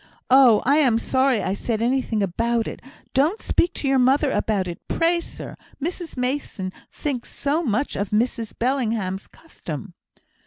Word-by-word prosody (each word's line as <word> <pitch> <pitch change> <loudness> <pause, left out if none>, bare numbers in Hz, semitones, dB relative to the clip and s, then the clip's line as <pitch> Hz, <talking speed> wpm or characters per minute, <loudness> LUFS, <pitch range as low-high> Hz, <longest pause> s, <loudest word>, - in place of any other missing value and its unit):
Oh! 255 -5 +7
I 280 +3 +4
am 255 -7 +4
sorry 260 -2 +2
I 185 - 0
said 220 +2 -2
anything 235 -3 +1
about 230 +5 0
it. - - -7 0.3
Don't 300 +11 +2
speak 345 - +1
to 280 - -2
your 270 -1 +3
mother 265 +3 +3
about 200 -4 0
it, 175 - -6
pray, 340 +1 +2
sir. - - -8 0.2
Mrs 335 0 -4
Mason 250 -7 -2 0.2
thinks 270 -5 -4
so 290 +4 0
much 265 -1 -1
of 200 0 -2
Mrs 230 +1 -1
Bellingham's 225 -7 -1
custom." 175 - -9
250 Hz, 155 wpm, -23 LUFS, 215-280 Hz, 0.3 s, Oh